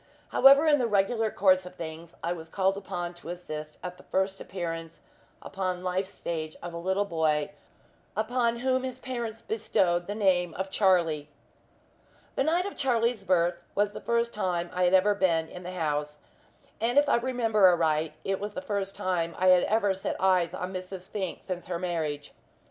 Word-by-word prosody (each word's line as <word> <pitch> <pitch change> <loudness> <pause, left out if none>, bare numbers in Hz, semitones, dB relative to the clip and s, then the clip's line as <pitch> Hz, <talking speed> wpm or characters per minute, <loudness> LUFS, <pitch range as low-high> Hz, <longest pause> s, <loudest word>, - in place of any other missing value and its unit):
However, 275 +3 +7
in 295 -2 +5
the 245 - +1
regular 220 +2 +2
course 185 -3 +3
of 180 0 -11
things, 165 0 -8
I 170 +1 0
was 165 -2 -9
called 190 +1 +1
upon 180 -3 -4
to 175 -1 -11
assist 155 -3 -6
at 180 0 -6
the - - -15
first 190 0 0
appearance 165 -3 -5 0.4
upon 185 -2 -3
life's 185 +1 -1
stage 155 -4 -5
of 175 -1 -6
a 170 - -5
little 190 +3 0
boy, 155 -5 0 0.7
upon 235 +1 0
whom 260 0 +2
his 255 -1 -5
parents 235 -4 -5
bestowed 175 -5 0
the 205 - -3
name 180 -5 +2
of 190 +1 -4
Charlie. 170 -8 +2 1.0
The - - +1
night 340 +5 +2
of 400 - -5
Charlie's 235 -4 +1
birth 175 -2 +2
was 205 0 +2
the - - -8
first 235 0 0
time 175 -4 -1
I 180 0 +2
had 180 +1 +5
ever 200 +2 +4
been 170 -5 +1
in 180 - -9
the 180 0 -7
house, 150 -3 -2 0.6
and 240 +4 0
if 290 0 +6
I - - +4
remember 230 -5 +3
aright 160 -3 +2
it 195 0 -1
was 205 +1 -5
the - - -2
first 200 -5 -2
time 170 -3 -1
I 185 0 +4
had 180 -1 +6
ever 205 -2 +2
set 190 - -3
eyes 185 -2 +2
on 180 +1 -4
Mrs. 185 0 -7
Fink 190 -4 -4
since 180 -2 -5
her 175 -1 -2
marriage. 160 -5 -3
185 Hz, 185 wpm, -28 LUFS, 170-215 Hz, 1.0 s, However